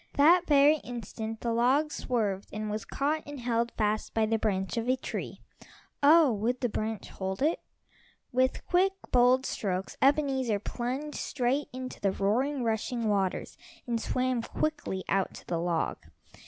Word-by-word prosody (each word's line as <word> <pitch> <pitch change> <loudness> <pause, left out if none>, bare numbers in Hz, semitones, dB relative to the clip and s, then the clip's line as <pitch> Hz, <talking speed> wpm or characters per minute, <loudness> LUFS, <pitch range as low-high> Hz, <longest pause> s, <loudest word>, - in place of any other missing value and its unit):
That 340 +5 +5
very 290 +1 +6
instant 225 -3 -6
the 235 -1 -1
log 265 +6 +3
swerved 210 -9 -2
and 215 0 -4
was 215 +1 -3
caught 300 +3 -1
and 290 -1 -7
held 235 -1 0
fast 215 0 -1
by 220 -1 +3
the 225 +1 0
branch 195 -2 -1
of 230 +1 -1
a 255 - +4
tree. - - -6 0.6
Oh, 300 0 +7
would 230 +4 -1
the 245 - +1
branch 220 0 -3
hold 190 +5 -4
it? 320 +3 +2 0.7
With 255 0 +1
quick, 375 +2 +3 0.2
bold 250 +1 +4
strokes 190 -2 -3
Ebenezer 270 -5 +2
plunged 255 +8 -4
straight 265 +2 0
into 255 0 -7
the 195 - +2
roaring, 250 +8 0
rushing 225 0 -1
waters, 195 -3 -1 0.3
and 235 -2 -1
swam 255 0 0
quickly 290 -8 -2
out 195 -1 0
to - - -11
the 170 - -2
log. 170 -1 -1
240 Hz, 155 wpm, -29 LUFS, 215-275 Hz, 0.7 s, Oh